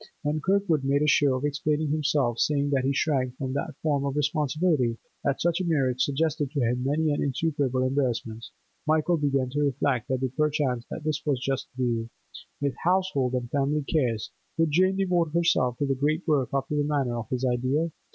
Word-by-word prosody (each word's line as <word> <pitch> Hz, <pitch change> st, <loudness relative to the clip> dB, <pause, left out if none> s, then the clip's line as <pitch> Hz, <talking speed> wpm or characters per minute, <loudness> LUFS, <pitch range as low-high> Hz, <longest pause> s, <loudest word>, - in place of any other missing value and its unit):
When 150 Hz, +1 st, -1 dB
Kirkwood 190 Hz, -5 st, +1 dB
made 140 Hz, +2 st, +2 dB
a -, -, +2 dB
show 140 Hz, -2 st, +4 dB
of 130 Hz, +3 st, -2 dB
explaining 150 Hz, +1 st, 0 dB
himself, 145 Hz, -6 st, +1 dB
saying 145 Hz, -1 st, +1 dB
that 135 Hz, -2 st, +2 dB
he 135 Hz, -, +2 dB
shrank 130 Hz, -3 st, 0 dB
from 130 Hz, -2 st, -3 dB
that 140 Hz, -, -3 dB
form 145 Hz, -3 st, +1 dB
of 140 Hz, -1 st, -2 dB
responsibility, 150 Hz, -3 st, +1 dB, 0.3 s
that 140 Hz, -1 st, 0 dB
such 170 Hz, +1 st, +1 dB
a -, -, -1 dB
marriage 135 Hz, -7 st, +1 dB
suggested 145 Hz, +1 st, 0 dB
to 145 Hz, +1 st, -3 dB
him 125 Hz, 0 st, 0 dB
many 150 Hz, +3 st, +1 dB
and 145 Hz, -, -1 dB
insuperable 140 Hz, -2 st, 0 dB
embarrassments, 120 Hz, -4 st, -2 dB, 0.4 s
Michael 160 Hz, +2 st, +2 dB
began 140 Hz, -4 st, 0 dB
to 145 Hz, -, -2 dB
reflect 135 Hz, -3 st, 0 dB
that 130 Hz, 0 st, 0 dB
perchance 145 Hz, -5 st, 0 dB, 0.2 s
this 155 Hz, -1 st, -1 dB
was 145 Hz, -3 st, +1 dB
the 125 Hz, -, -8 dB
just 135 Hz, -1 st, -1 dB
view. 115 Hz, -3 st, -1 dB, 0.5 s
With 140 Hz, -1 st, 0 dB
household 175 Hz, -8 st, +1 dB
and 125 Hz, -1 st, -2 dB
family 145 Hz, +1 st, +1 dB
cares, 125 Hz, -8 st, -1 dB, 0.3 s
could 165 Hz, -2 st, +2 dB
Jane 185 Hz, +4 st, +3 dB
devote 175 Hz, -5 st, +1 dB
herself 130 Hz, -8 st, +2 dB
to 145 Hz, -, 0 dB
the 135 Hz, -, +1 dB
great 150 Hz, +7 st, -1 dB
work 145 Hz, -5 st, +2 dB
after 135 Hz, +2 st, -1 dB
the 145 Hz, -, +2 dB
manner 140 Hz, -5 st, 0 dB
of 110 Hz, -, -7 dB
his 130 Hz, 0 st, -1 dB
ideal? 130 Hz, +6 st, 0 dB
140 Hz, 190 wpm, -26 LUFS, 130-155 Hz, 0.5 s, show